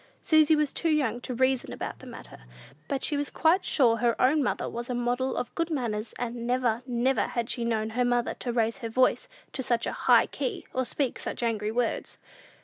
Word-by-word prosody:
Susy 315 -1 +5
was 300 -2 0
too 335 - 0
young 260 -7 +1
to 250 - -5
reason 260 0 +1
about - - -6
the - - -12
matter; - - -11 0.4
but 275 -1 -2
she 300 - +1
was 290 0 -1
quite 345 +4 +2
sure 235 -5 +3
her 235 0 +1
own 290 +4 +4
mother 265 - -1
was 240 +1 -5
a 250 - -1
model 245 +2 -1
of 245 - -3
good 335 0 -1
manners; 230 -7 -3
and 235 -1 -4
never, 245 -2 +1
never 250 +2 +1
had 235 -2 -2
she 240 - 0
known 220 -2 -1
her 250 +2 +1
mother 245 -1 +1
to 245 - -4
raise 230 -1 0
her 230 -4 -5
voice 255 +3 +2 0.3
to - - -2
such 240 -2 0
a - - -2 0.2
high - - +7
key, 430 -7 -4
or 260 0 0
speak 270 0 -1
such - - -4
angry 215 -2 -1
words! 240 0 -2
245 Hz, 215 wpm, -27 LUFS, 235-270 Hz, 0.4 s, high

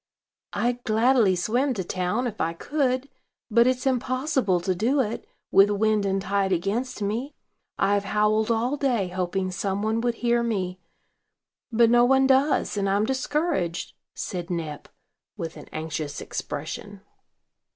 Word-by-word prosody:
"I'd 240 +4 -1
gladly 225 -2 +3
swim 245 +9 0
to 190 - -2
town, 185 +7 -1
if 220 -3 -4
I 165 +1 0
could; 260 - -1 0.4
but 235 +2 +5
it's 255 0 0
impossible 255 - +1
to 185 +2 0
do 235 +10 +1
it, 235 - -2 0.2
with 195 +1 +6
wind 210 0 +1
and 195 0 +1
tide 195 0 0
against 210 +7 -1
me. 230 +8 -3 0.4
I've 200 0 +2
howled 215 +2 +2
all 235 +5 +1
day, 240 -10 0
hoping 185 +1 -2
some 195 +2 -2
one 220 +1 0
would 240 0 0
hear 240 0 +1
me; 190 -6 -2 0.9
but 230 0 +4
no 240 0 +6
one 265 +2 +4
does, 270 -3 +2
and 200 -1 +1
I'm 200 +2 +2
discouraged," 265 - -1 0.2
said 175 -2 -5
Nep, 160 -4 -4 0.5
with 165 -1 -5
an - - -11
anxious 155 -2 -4
expression. 190 +7 -6
215 Hz, 145 wpm, -25 LUFS, 190-250 Hz, 0.9 s, with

